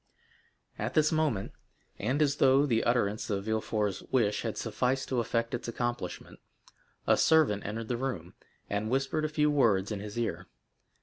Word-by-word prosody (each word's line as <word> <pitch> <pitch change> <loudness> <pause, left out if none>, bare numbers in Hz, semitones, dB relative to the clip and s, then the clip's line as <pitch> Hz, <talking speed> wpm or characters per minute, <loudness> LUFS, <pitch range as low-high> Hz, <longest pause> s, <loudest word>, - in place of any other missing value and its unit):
At 110 +4 -3
this 155 0 +4
moment, 155 -11 0 0.5
and 130 +8 +1
as 140 -1 +1
though 135 +2 +5
the 115 -5 +1
utterance 110 -3 +1
of 100 -2 -1
Villefort's 110 -2 -1
wish 105 -5 +2
had 115 -2 -3
sufficed 125 +4 -1
to 130 - +1
effect 115 0 -1
its 120 - -3
accomplishment, 120 -4 -4 0.7
a - - +5
servant 150 -11 +3
entered 110 +2 -4
the 120 - -1
room, 100 -10 -4 0.3
and 105 +2 -2
whispered 135 +4 0
a - - -1
few 150 0 +2
words 110 -8 +2
in 105 - -3
his 105 +2 -7
ear. 120 -1 -2
120 Hz, 165 wpm, -30 LUFS, 105-135 Hz, 0.7 s, though